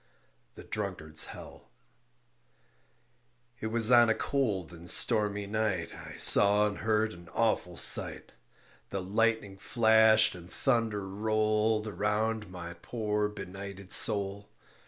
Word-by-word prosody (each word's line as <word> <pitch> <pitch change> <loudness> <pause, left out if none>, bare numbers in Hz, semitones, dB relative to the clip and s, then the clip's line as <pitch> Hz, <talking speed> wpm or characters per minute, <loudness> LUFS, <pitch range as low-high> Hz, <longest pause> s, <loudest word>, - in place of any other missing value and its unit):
THE - - -12
DRUNKARD'S 85 -7 -5
HELL - - -13 1.9
It 110 - -5
was 115 +1 +3
on 120 -1 +5
a 110 - +1
cold 105 -9 -3
and 85 +1 -6
stormy 105 -3 +2
night 100 -5 -3
I - - -12
saw 105 +1 +5
and 105 -1 -5
heard 110 0 -1
an 85 -1 -15
awful 105 -6 -2
sight; - - +3 0.6
The 95 -1 -5
lightning 105 0 -2
flashed 110 0 +3
and 90 -1 -13
thunder 110 -3 -2
rolled 110 +1 -1
Around 110 0 -3
my 85 -2 -9
poor 105 -3 -3
benighted 100 -1 -10
soul. 100 -1 +4
105 Hz, 115 wpm, -28 LUFS, 95-110 Hz, 1.9 s, on